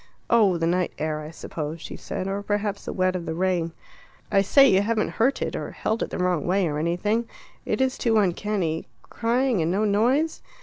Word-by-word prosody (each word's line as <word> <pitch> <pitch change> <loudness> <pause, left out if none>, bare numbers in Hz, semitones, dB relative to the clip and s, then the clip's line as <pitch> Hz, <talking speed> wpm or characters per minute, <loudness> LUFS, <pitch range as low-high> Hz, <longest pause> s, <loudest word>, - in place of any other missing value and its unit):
"Oh, 210 -6 +5
the 165 - 0
night 180 +1 0
air, 155 0 -2
I 150 - -7
suppose," 160 -1 -6
she - - -8
said, 185 - -5
"or 195 +1 -2
perhaps 205 0 -2
the - - -3
wet 185 0 +1
of 175 -2 -4
the 160 - -2
rain." 175 -2 0 0.6
"I 195 - +5
say, 275 +8 +6
you 190 -5 +4
haven't 215 +1 0
hurt 265 +4 +2
it, - - -3
or - - -4
held 220 +1 -2
it - - -1
the - - -5
wrong 180 -4 0
way, 185 0 +2
or 150 -1 -2
anything; 205 +8 0 0.4
it - - 0
is 260 0 0
too 225 -2 +2
uncanny 185 -4 0 0.2
crying 240 -2 +1
and 160 - +1
no 200 +4 +1
noise. 250 +10 +2
195 Hz, 210 wpm, -25 LUFS, 170-220 Hz, 0.6 s, say